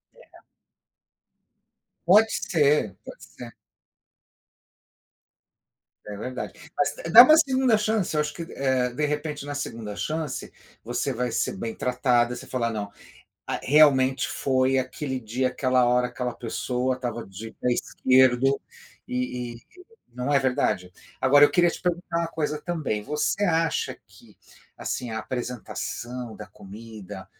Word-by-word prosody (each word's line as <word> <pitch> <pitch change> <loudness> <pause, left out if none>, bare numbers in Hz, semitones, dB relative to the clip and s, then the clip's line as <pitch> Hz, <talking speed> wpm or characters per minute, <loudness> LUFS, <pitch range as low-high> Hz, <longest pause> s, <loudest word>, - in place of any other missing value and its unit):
Legal. - - -19 1.6
Pode 215 +5 +6
ser. 145 - +1
Pode - - -11
ser. - - -11 2.5
É 105 -1 -7
verdade. 130 +6 -7
Mas 180 - +1
d 165 - -7
dá 235 +7 +11
uma 310 +4 +7
2ª 260 -6 +3
chance, 210 -7 0
acho 150 0 0
que, 170 - -6
eh, 130 -2 0
de 150 +5 -2
repente, 150 -1 -3
na 145 0 -5
2ª 115 -7 -5
chance, 155 -1 -4 0.3
você - - -2
vai 125 0 -2
ser 115 - -1
bem 115 +3 -4
tratada, 125 -1 +1
você - - -9
fala: 120 -3 -1
"Não, 105 -2 -4 0.6
a - - -2
realmente 135 -4 +4
foi 130 +1 +1
aquele 130 +1 -3
dia, 125 +3 -1
aquela 130 -1 +2
hora, 125 0 +2
aquela 125 0 -4
pessoa 125 +3 -2
estava 120 -3 -5
de 105 +4 -9
pé 125 - -1
esquerdo", 130 +2 +3 0.5
e 125 -1 -3
e - - -15 0.5
não 125 +4 -2
é 140 - +5
verdade? 105 -8 0 0.3
Agora 145 +2 +6
eu - - +4
queria 175 -1 +4
te - - -8
perguntar 175 -1 -2
uma 170 0 -1
coisa 150 -2 -3
também: 150 -10 -3
Você 150 - -1
acha 165 -2 0
que, - - -20 0.4
assim, 125 -2 -4
a 110 - -3
apresentação 120 -1 -5
da 105 - -9
comida, 100 -1 -11
130 Hz, 140 wpm, -25 LUFS, 120-150 Hz, 2.5 s, dá